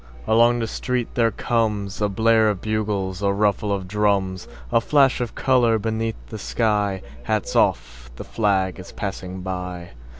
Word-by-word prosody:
Along 120 Hz, +2 st, +4 dB
the 115 Hz, -, -1 dB
street 125 Hz, +1 st, -2 dB
there 115 Hz, -1 st, +3 dB
comesA 105 Hz, -3 st, -1 dB
blare 110 Hz, +1 st, +3 dB
of 100 Hz, -3 st, -2 dB
bugles, 105 Hz, -3 st, -2 dB
a 100 Hz, -1 st, +2 dB
ruffle 105 Hz, 0 st, +1 dB
of 95 Hz, -2 st, -2 dB
drums,A 95 Hz, -, -1 dB
flash 135 Hz, 0 st, +3 dB
of 120 Hz, -2 st, -4 dB
color 120 Hz, -4 st, +3 dB
beneath 110 Hz, +1 st, -2 dB
the -, -, -7 dB
sky:Hats 95 Hz, -, -1 dB
off! -, -, 0 dB
The -, -, -7 dB
flag 95 Hz, -4 st, 0 dB
is 90 Hz, -, -10 dB
passing 95 Hz, -2 st, -5 dB
by! 90 Hz, -2 st, -5 dB
105 Hz, 140 wpm, -22 LUFS, 95-115 Hz, -, Along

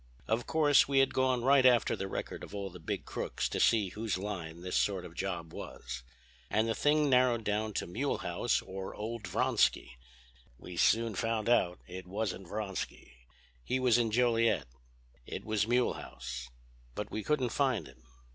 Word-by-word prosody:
"Of 115 Hz, +2 st, 0 dB
course 150 Hz, -3 st, +5 dB
we 140 Hz, -1 st, +1 dB
had 135 Hz, 0 st, +4 dB
gone 130 Hz, -2 st, +2 dB
right 135 Hz, +1 st, +5 dB
after 125 Hz, -3 st, +5 dB
the 95 Hz, -, -4 dB
record -, -, -5 dB
of 105 Hz, -, -8 dB
all 100 Hz, -2 st, -4 dB
the 90 Hz, -, -11 dB
big 80 Hz, -, -4 dB
crooks -, -, -2 dB
to -, -, -2 dB
see 105 Hz, -4 st, +4 dB
whose 105 Hz, 0 st, -2 dB
line 90 Hz, -4 st, -5 dB
this 90 Hz, 0 st, -3 dB
sort 95 Hz, -3 st, +1 dB
of 85 Hz, -, -10 dB
job 85 Hz, -3 st, -4 dB
was. 60 Hz, 0 st, -7 dB, 0.5 s
And 110 Hz, +1 st, +2 dB
the 115 Hz, -, +1 dB
thing 150 Hz, +5 st, +3 dB
narrowed 125 Hz, -3 st, +4 dB
down 105 Hz, +1 st, -1 dB
to -, -, -2 dB
Mulehaus 125 Hz, +11 st, -1 dB
or 95 Hz, 0 st, -6 dB
old 110 Hz, 0 st, -5 dB
Vronsky. -, -, +1 dB, 0.6 s
We 90 Hz, -, -9 dB
soon 115 Hz, +5 st, +3 dB
found 115 Hz, +2 st, -1 dB
out 90 Hz, -7 st, +2 dB
it 90 Hz, 0 st, -8 dB
wasn't 100 Hz, -1 st, -3 dB
Vronsky. 100 Hz, -, -5 dB, 0.5 s
He 130 Hz, -, 0 dB
was 125 Hz, -2 st, +4 dB
in 115 Hz, -2 st, +2 dB
Joliet. 115 Hz, 0 st, +2 dB, 0.6 s
It -, -, -6 dB
was 110 Hz, -1 st, +1 dB
Mulehaus. 65 Hz, -, -2 dB, 0.5 s
But -, -, -4 dB
we 110 Hz, -, -2 dB
couldn't 130 Hz, 0 st, +1 dB
find 130 Hz, -3 st, +1 dB
him. 65 Hz, -, -15 dB
110 Hz, 170 wpm, -32 LUFS, 95-120 Hz, 0.6 s, course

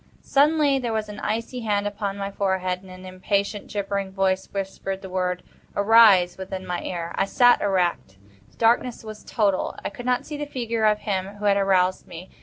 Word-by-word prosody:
Suddenly 290 Hz, -1 st, +3 dB
there 230 Hz, -3 st, -1 dB
came 210 Hz, -1 st, -7 dB
an 205 Hz, -, -9 dB
icy 230 Hz, +4 st, -3 dB
hand 205 Hz, -3 st, 0 dB
upon 205 Hz, -1 st, -3 dB
my 200 Hz, 0 st, -4 dB
forehead, 190 Hz, -2 st, -1 dB
and 190 Hz, -, -15 dB
an 185 Hz, 0 st, -11 dB
impatient, 200 Hz, +2 st, -2 dB
gibbering 200 Hz, -1 st, -3 dB
voice 190 Hz, 0 st, 0 dB
whispered 195 Hz, 0 st, -4 dB
the 190 Hz, -, -8 dB
word 180 Hz, -1 st, -1 dB, 0.3 s
"Arise!" 200 Hz, -4 st, +5 dB
within 190 Hz, 0 st, -6 dB
my 175 Hz, -1 st, -3 dB
ear. 170 Hz, -2 st, -4 dB
I 195 Hz, -, +3 dB
sat 245 Hz, +4 st, +4 dB
erect. 180 Hz, -, 0 dB, 0.3 s
The -, -, -28 dB
darkness 235 Hz, +1 st, +2 dB
was 215 Hz, -1 st, -9 dB
total. 200 Hz, -5 st, 0 dB
I -, -, -2 dB
could 245 Hz, +5 st, -8 dB
not 250 Hz, 0 st, +1 dB
see 300 Hz, -, -6 dB
the 295 Hz, 0 st, -4 dB
figure 235 Hz, -5 st, -2 dB
of 210 Hz, 0 st, +2 dB
him 195 Hz, 0 st, -3 dB
who 205 Hz, 0 st, -6 dB
had 200 Hz, -1 st, +4 dB
aroused 190 Hz, -2 st, +2 dB
me. 175 Hz, +2 st, -10 dB
200 Hz, 195 wpm, -24 LUFS, 185-220 Hz, 0.3 s, Arise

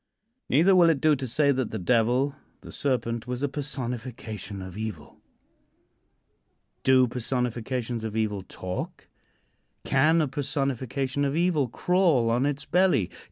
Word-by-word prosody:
Neither 170 Hz, +8 st, +5 dB
will 175 Hz, -2 st, +6 dB
it 155 Hz, -4 st, +2 dB
do 155 Hz, +1 st, +4 dB
to 130 Hz, -1 st, -4 dB
say 140 Hz, +4 st, +2 dB
that 130 Hz, -3 st, -1 dB
the 110 Hz, -, -4 dB
Devil 125 Hz, +7 st, +2 dB, 0.3 s
the -, -, -11 dB
Serpent 120 Hz, -4 st, -2 dB
was 125 Hz, +2 st, -3 dB
a -, -, +2 dB
personification 120 Hz, -7 st, -5 dB
of 95 Hz, -1 st, -8 dB
evil. 110 Hz, 0 st, -7 dB, 1.6 s
Do 130 Hz, -1 st, +5 dB
personifications 125 Hz, -1 st, -2 dB
of 110 Hz, -1 st, -4 dB
evil 105 Hz, -3 st, -1 dB
talk? 90 Hz, -1 st, -6 dB, 0.8 s
Can 155 Hz, +5 st, +3 dB
a 155 Hz, -, +2 dB
personification 135 Hz, -1 st, -2 dB
of 140 Hz, 0 st, 0 dB
evil 165 Hz, -5 st, +2 dB
crawl 160 Hz, -4 st, +2 dB
on 125 Hz, +4 st, +2 dB
its 145 Hz, 0 st, -3 dB
belly? 180 Hz, -, +2 dB
130 Hz, 135 wpm, -26 LUFS, 115-145 Hz, 1.6 s, will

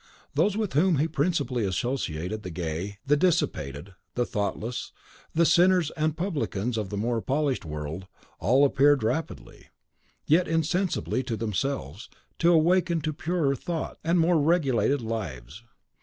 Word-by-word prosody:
Those 210 Hz, 0 st, +2 dB
with 215 Hz, -7 st, -2 dB
whom 165 Hz, +3 st, +3 dB
he 150 Hz, +4 st, +2 dB
principally 145 Hz, -6 st, 0 dB
associated 95 Hz, -, -2 dB
the 95 Hz, -, -6 dB
gay, 85 Hz, +4 st, -4 dB
the 145 Hz, +1 st, +4 dB
dissipated, 100 Hz, -, 0 dB, 0.2 s
the 120 Hz, -, +1 dB
thoughtless, 110 Hz, +3 st, -3 dB, 0.4 s
the 170 Hz, +1 st, +4 dB
sinners 175 Hz, -1 st, +4 dB
and 155 Hz, 0 st, -1 dB
publicans 140 Hz, -, -2 dB
of 105 Hz, -4 st, -3 dB
the 105 Hz, -, -4 dB
more 115 Hz, +2 st, 0 dB
polished 140 Hz, -, -1 dB
world 75 Hz, +4 st, -5 dB, 0.3 s
all 130 Hz, +10 st, +4 dB
appeared 140 Hz, -1 st, +4 dB
rapidly, 160 Hz, +9 st, -4 dB, 0.6 s
yet 170 Hz, +4 st, +3 dB
insensibly 165 Hz, -2 st, 0 dB
to 120 Hz, -3 st, -4 dB
themselves, 105 Hz, -, -3 dB, 0.3 s
to 170 Hz, +1 st, +4 dB
awaken 170 Hz, +1 st, +3 dB
to 155 Hz, +1 st, -2 dB
purer 155 Hz, -3 st, 0 dB
thoughts 165 Hz, +5 st, -4 dB
and 170 Hz, +2 st, +2 dB
more 165 Hz, -1 st, +3 dB
regulated 140 Hz, -5 st, +2 dB
lives. 90 Hz, -, -5 dB
135 Hz, 140 wpm, -26 LUFS, 105-165 Hz, 0.6 s, the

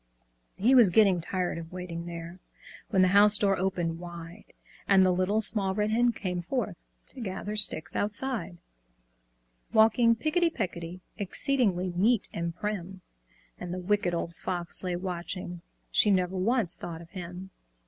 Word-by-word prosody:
He 235 Hz, +7 st, +2 dB
was 240 Hz, -7 st, +7 dB
getting 195 Hz, -2 st, +3 dB
tired 180 Hz, 0 st, -2 dB
of 165 Hz, 0 st, -10 dB
waiting 175 Hz, -2 st, -7 dB
there, 170 Hz, +1 st, -8 dB, 0.5 s
When 190 Hz, -1 st, +3 dB
the 185 Hz, -, +3 dB
house 205 Hz, +2 st, +5 dB
door 195 Hz, -1 st, +2 dB
opened 175 Hz, -3 st, -2 dB
wide, 170 Hz, -1 st, -10 dB, 0.4 s
And 190 Hz, -1 st, +5 dB
the 185 Hz, -, +3 dB
Little 185 Hz, +4 st, 0 dB
Small 195 Hz, -3 st, +3 dB
Red 210 Hz, +1 st, 0 dB
Hen 240 Hz, +2 st, +3 dB
came 180 Hz, -5 st, -4 dB
forth 210 Hz, 0 st, -3 dB, 0.3 s
To 260 Hz, -, -11 dB
gather 205 Hz, 0 st, -5 dB
sticks 185 Hz, -5 st, +6 dB
outside; 205 Hz, -4 st, -3 dB, 1.2 s
Walking 225 Hz, +1 st, +4 dB
picketty 325 Hz, +7 st, +1 dB
pecketty, 180 Hz, -, -5 dB, 0.2 s
Exceedingly 200 Hz, -4 st, +1 dB
neat 220 Hz, +5 st, +2 dB
and 170 Hz, 0 st, -4 dB
prim; 190 Hz, -2 st, -5 dB, 0.6 s
And 180 Hz, -1 st, -6 dB
the 180 Hz, -, -4 dB
Wicked 185 Hz, -1 st, 0 dB
Old 170 Hz, 0 st, -4 dB
Fox 175 Hz, +1 st, -4 dB
lay 180 Hz, -1 st, -2 dB
watching; 180 Hz, -1 st, -6 dB, 0.3 s
She 210 Hz, -, +3 dB
never 185 Hz, -1 st, +1 dB
once 205 Hz, -1 st, +1 dB
thought 170 Hz, -1 st, -8 dB
of 165 Hz, -, -19 dB
him! 180 Hz, 0 st, -8 dB
185 Hz, 150 wpm, -28 LUFS, 175-210 Hz, 1.2 s, was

